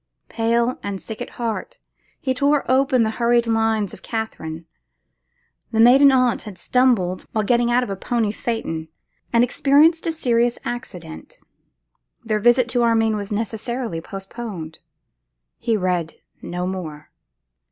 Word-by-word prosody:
Pale 235 +2 0
and 200 -1 -4
sick 220 +4 -8
at - - -5
heart, 230 -2 -4 0.4
he 260 - -1
tore 285 +2 +2
open 260 -1 +3
the 220 - 0
hurried 235 0 +3
lines 225 -3 +1
of - - -11
Katherine. 165 -8 -5 1.1
The 225 - -1
maiden 265 +4 +7
aunt 255 -2 +2
had 210 -4 -10
stumbled 215 -5 +1
while 215 - +1
getting 240 +2 +2
out 245 +1 +3
of 210 - -5
a - - -2
pony 220 +2 -1
phaeton, 205 -9 -4 0.4
and 235 0 +4
experienced 300 +7 +3
a - - +2
serious 240 -6 +1
accident; 185 - -7 0.9
their 215 -2 0
visit 240 +2 +4
to 245 +1 +1
Armine 225 -2 +3
was 205 0 -5
necessarily 225 -2 -3
postponed. 195 -4 -7 0.8
He 230 -2 0
read 180 -4 -1 0.3
no 180 +1 -4
more. 165 -5 -6
230 Hz, 140 wpm, -21 LUFS, 195-245 Hz, 1.1 s, maiden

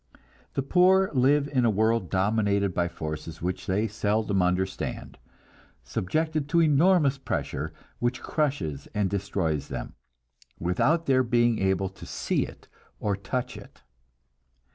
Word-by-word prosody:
The 135 - 0
poor 185 +5 +4
live 140 +2 +3
in 130 -3 +1
a 115 - +4
world 110 -2 +1
dominated 100 0 +1
by 85 0 +1
forces 80 0 -6
which 90 +1 -3
they 105 +4 +1
seldom 105 -1 0
understand, 90 +1 -2 0.6
subjected 155 - -1
to 170 +2 +3
enormous 155 -2 +4
pressure 80 - -3 0.3
which 120 +1 -1
crushes 130 - -2
and 105 -3 +1
destroys 95 -7 -1
them, 65 -2 -6 0.7
without 145 - +1
their 130 -1 +4
being 120 -2 +2
able 95 0 +1
to 95 - -12
see - - -1
it - - -14 0.3
or 100 -2 0
touch 125 +6 -3
it. - - -13
110 Hz, 130 wpm, -27 LUFS, 95-140 Hz, 0.7 s, poor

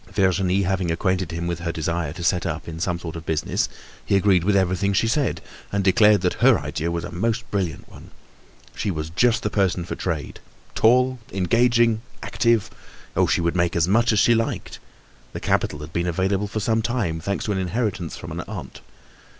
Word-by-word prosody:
Virginie 95 -1 +2
having 95 -1 0
acquainted 95 +1 0
him 85 +1 -4
with 85 -1 -2
her 85 0 -2
desire 85 -1 -2
to 85 +3 -7
set 90 0 +2
up 85 -2 -4
in 80 -1 -6
some 90 0 -1
sort 85 -2 -7
of 80 - -6
business, 80 -1 -1 0.3
he - - +1
agreed 95 -3 +4
with 100 +2 +2
everything 95 +1 +1
she 115 - +2
said, 140 +4 0 0.3
and 100 -1 0
declared 105 +1 +5
that 90 -1 +1
her - - +6
idea 80 +2 -3
was 85 0 -2
a 90 - -6
most 115 +6 -1
brilliant 90 -8 -2
one. - - -14 0.7
She - - -2
was 80 -3 -3
just 115 +6 +2
the 105 - -1
person 95 -4 +1
for - - -5
trade—tall, 120 - 0
engaging 115 +5 +3
and 110 0 -4 0.2
active. 115 -3 +1 0.4
Oh! - - +3
she - - +1
would 85 +1 0
make 85 -1 +1
as 85 -1 +2
much 115 +5 +3
as 110 - +1
she 120 - +5
liked. 115 0 -2 0.5
The - - -4
capital - - 0
had 75 +2 -9
been 85 +1 0
available 95 +4 0
for 110 - -3
some 110 +1 +1
time, 110 -9 -1
thanks 100 +4 -3
to 105 - -1
an 95 - 0
inheritance 95 -3 -2
from - - -8
an - - -5
aunt. - - -8
95 Hz, 200 wpm, -23 LUFS, 85-105 Hz, 0.7 s, her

